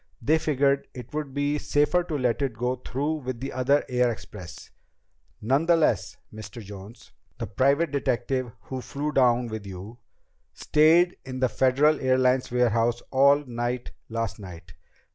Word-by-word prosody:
They 160 +2 +2
figured 140 -2 +1
it 125 +2 -10
would 150 -2 -3
be 145 +2 -1
safer 150 +6 +2
to 155 -4 -3
let 125 -1 0
it 130 -5 -2
go 125 +2 -1
through 145 +5 -2
with 130 -4 -5
the 135 +2 -5
other 135 +3 +2
air 125 -1 +2
express. 105 -5 -10 0.7
Nonetheless, 150 - +2 0.2
Mr. 110 +1 -9
Jones 100 +2 -11 0.3
the - - -4
private 140 +4 +1
detective 130 -2 -1
who 130 -1 -6
flew 145 +4 -4
down 125 -3 +3
with 110 -3 -6
you 100 +5 -9 0.6
stayed 165 +4 +4
in 130 0 -6
the 130 -1 +2
Federal 135 +7 +3
Airlines 130 0 +2
warehouse 120 -1 +1
all 140 +2 +4
night 120 0 -3 0.2
last 115 -1 -3
night. 85 -3 -11
130 Hz, 145 wpm, -26 LUFS, 115-145 Hz, 0.7 s, stayed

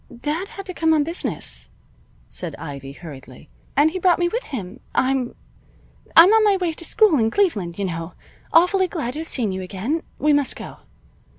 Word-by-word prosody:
"Dad 310 +8 -2
had 395 -1 -9
to 370 - -5
come 320 -2 +2
on 300 - +3
business," 195 - -3 0.6
said - - -5
Ivy, 140 -1 -7
hurriedly. 140 -3 -12 0.3
"And 300 +2 +4
he 370 - -3
brought 360 -1 +4
me 350 - +2
with 475 +8 -3
him. 225 -3 -6 0.2
I'm 260 -2 +1 0.8
I'm 350 +6 +9
on 445 -1 +5
my 410 -2 +4
way 355 -3 -1
to 335 - -10
school 400 - +4
in 225 -1 +3
Cleveland, 210 - 0
you 200 - -1
know. 165 -1 -4 0.4
Awfully 360 +3 +4
glad 300 -9 -3
to 300 - -5
have 325 - -5
seen 225 -7 -1
you 190 0 -4
again. 205 - -2 0.2
We 300 0 +3
must 285 -2 +1
go. - - -9
290 Hz, 190 wpm, -22 LUFS, -, 0.8 s, I'm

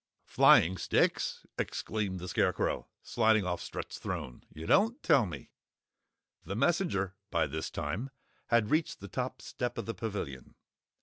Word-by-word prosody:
"Flying 90 +3 +5
sticks?" - - +1
exclaimed 100 -4 -2
the 90 - -6
Scarecrow, - - 0 0.2
sliding 110 -3 +3
off 90 -1 -2
Strut's - - -6
throne. 60 - -5
"You 80 +1 -8
don't 225 - +3
tell 125 -7 +4
me?" 85 - -8 0.9
The 100 - -5
messenger, 120 - +1 0.2
by 85 -3 +2
this 80 +2 -4
time 85 - -3 0.4
had 115 0 +2
reached 155 +1 +1
the 100 - -8
top 125 +6 -4
step 125 -1 -4
of 115 - -3
the 115 - -3
Pavilion. 95 - -5
100 Hz, 140 wpm, -31 LUFS, 90-120 Hz, 0.9 s, Flying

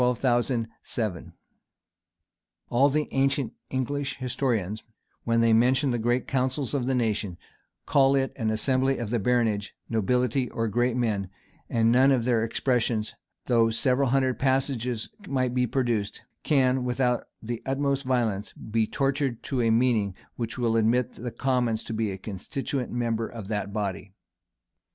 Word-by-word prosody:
[] - - +4
All 125 0 +3
the 120 -1 +1 2.5
ancient 135 -2 +1 0.2
English 140 +2 -2
historians, 115 -6 -1 0.4
when 115 0 +2
they 115 -1 +4
mention 130 +4 +3
the 120 - -1
great 120 +2 0
council 130 +2 0
of 130 -3 -1
the 130 - +1
nation, 105 -6 -1 0.5
call 135 -1 +4
it 135 -1 0
an 110 -4 -1
assembly 130 +4 +2
of 115 -3 -4
the 120 - +1
baronage, 110 -3 0
nobility, 125 +3 +1
or 115 0 -2
great 120 +3 +1
men; 105 -6 0 0.4
and 115 0 +3
none 130 +3 +5
of 125 -4 +2
their 120 -3 +2
expressions, 115 -2 0 0.3
though 115 -2 +3
several 125 +4 +2
hundred 130 -1 +1
passages 130 -3 0 0.2
might 130 -2 0
be 125 0 +1
produced, 115 -6 -1 0.2
can, 130 -3 +2
without 125 0 0
the 115 +1 -5
utmost 140 0 0
violence, 115 -6 -1
be 110 0 -1
tortured 135 -3 -1
to 135 -7 -1
a 115 - +2
meaning 110 -4 +2 0.2
which 115 0 -4
will 115 -2 +1
admit 115 +2 +2
the 120 +2 -5
commons 120 -2 0
to 115 - -6
be 110 -3 -1
constituent 125 +7 -4
members 115 -2 -2
of 110 -3 -7
that 105 -2 -2
body. 100 -2 -4
120 Hz, 145 wpm, -26 LUFS, 110-130 Hz, 2.5 s, none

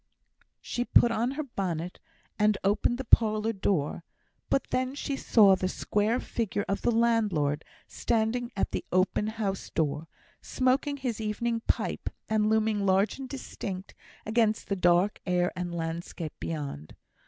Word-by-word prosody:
She 245 - -2
put 240 -1 +5
on 230 +2 +1
her 305 +2 -3
bonnet, 180 - -4 0.4
and 210 -1 +3
opened 205 +4 +2
the 265 - -4
parlour 220 -2 +3
door; 170 -5 -1 0.5
but 270 - +2
then 255 +1 0
she 285 -1 -3
saw 210 -7 +5
the 185 0 -1
square 210 +5 0
figure 210 -3 -2
of 195 - -1
the - - +2
landlord 210 -11 +2 0.2
standing 235 +1 -1
at - - 0
the - - -2
open 185 +3 +2
house 215 -3 -3
door, 155 0 -1 0.3
smoking 265 +3 +1
his 245 -5 -3
evening 230 +2 -1
pipe, - - -1 0.2
and 215 -1 +2
looming 220 -1 +2
large 195 +5 +2
and 265 -1 -6
distinct 200 -8 -6 0.3
against 220 0 +1
the 200 - +1
dark 180 +2 +3
air 180 0 +2
and 175 -1 -4
landscape 165 -1 -4
beyond. 140 - -5
210 Hz, 145 wpm, -28 LUFS, 180-235 Hz, 0.5 s, put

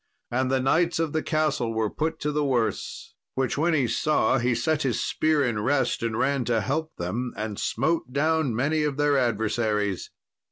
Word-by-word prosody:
And 130 +1 +1
the 135 0 +2
knights 165 +7 +2
of 165 -2 -1
the 155 - +1
castle 150 -8 0
were 110 -1 +1
put 160 +1 -2
to 150 - 0
the 150 0 0
worse; 125 -5 -2 0.2
which 130 -1 0
when 160 +3 +2
he 135 -5 +2
saw, 130 0 +2
he 120 0 +1
set 155 +6 0
his 130 -5 0
spear 155 -3 +1
in 115 -4 -1
rest 135 +4 +1
and 115 -1 -1
ran 140 0 +1
to 115 -2 +1
help 160 +10 -2
them, 115 +9 -3
and 105 -1 -4
smote 165 -5 0
down 150 -2 +1
many 150 +6 +1
of 150 -2 -1
their 145 -1 +3
adversaries. 110 -4 0
135 Hz, 190 wpm, -26 LUFS, 115-155 Hz, 0.2 s, their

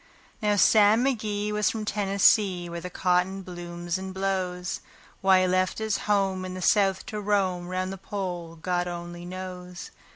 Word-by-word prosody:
Now 210 -1 +2
Sam 215 +3 +5
McGee 210 -5 -1
was 210 0 +2
from 220 -1 -4
Tennessee, 200 -2 +3
where 170 0 -6
the 180 - -6
cotton 180 +1 0
blooms 175 0 -5
and 190 0 -7
blows. 185 -2 -2 0.4
Why 190 -1 +5
he 185 - +2
left 185 0 +1
his 220 -1 0
home 195 -2 +2
in 185 0 -5
the 185 - -6
South 195 -1 +3
to 210 -1 -5
roam 190 -4 0
'round 185 +1 -2
the 195 - -9
Pole, 180 -4 -5
God 175 +2 -1
only 175 0 -6
knows. 180 -1 -7
185 Hz, 165 wpm, -26 LUFS, 180-205 Hz, 0.4 s, Sam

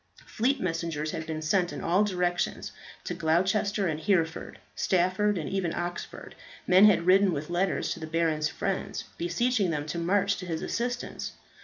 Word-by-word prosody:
Fleet 260 +5 0
messengers 165 -4 -2
had 160 - -5
been 155 -1 -4
sent 175 +3 +1
in - - -6
all 180 +5 +3
directions. 180 -3 -1 0.3
To - - -4
Gloucester 190 +5 +1
and 155 -2 -2
Hereford, 165 -3 0 0.2
Stafford, 185 +3 +1
and 160 - -3
even 190 -4 -1
Oxford, 175 0 -5 0.3
men 185 +3 +7
had 200 -5 +4
ridden, 190 +1 +5
with 150 +2 -4
letters 185 +2 0
to - - -10
the 160 - -6
baron's 160 -2 0
friends, 195 -1 -3 0.2
beseeching 200 +4 +1
them 150 -3 -2
to 155 +3 -4
march 200 +3 +1
to 180 0 -7
his 165 -2 -3
assistance. 245 +1 -3
180 Hz, 165 wpm, -28 LUFS, 165-195 Hz, 0.3 s, men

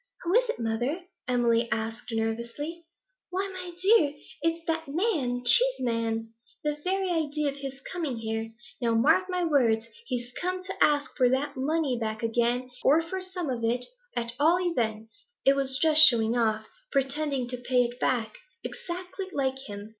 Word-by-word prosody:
'Who 350 +1 0
is - - +4
it, - - -1
mother?' 240 +9 -2 0.2
Emily 235 -2 +2
asked 225 +1 -3
nervously. 235 +9 -3 0.4
'Why, 380 +2 -1
my 365 -1 -6
dear, 375 -7 +4 0.3
it's 330 +1 -1
that 325 -1 -1
man 275 - 0
Cheeseman! 230 - +3 0.3
The 300 -1 0
very 380 0 0
idea 300 -3 0
of 280 - -7
his 275 -1 -6
coming 305 -6 -4
here! 225 0 -3 0.3
Now, 230 -1 +2
mark 290 +11 +4
my 360 -1 0
words, 235 -8 +3 0.2
he's 245 0 -3
come 365 0 -2
to 385 +1 0
ask 290 -1 +2
for 250 -3 +4
that 275 +3 0
money 275 -1 0
back 220 -1 -3
again, 240 +2 0
or 315 +4 +5
for 375 +3 -4
some 370 -3 -4
of 235 -2 -3
it, 240 +2 0 0.3
at 235 -1 -1
all 330 +4 +4
events. 230 - -2 0.2
It 275 - +6
was 270 -1 +1
just 310 -1 +5
showing 235 -6 +7
off, 220 -2 +1 0.3
pretending 275 -1 0
to 250 - -3
pay 250 0 +2
it 240 +1 -5
back; 225 -4 -1 0.3
exactly 365 +2 -6
like 265 -4 -1
him! 205 0 -7
270 Hz, 165 wpm, -28 LUFS, 235-330 Hz, 0.4 s, showing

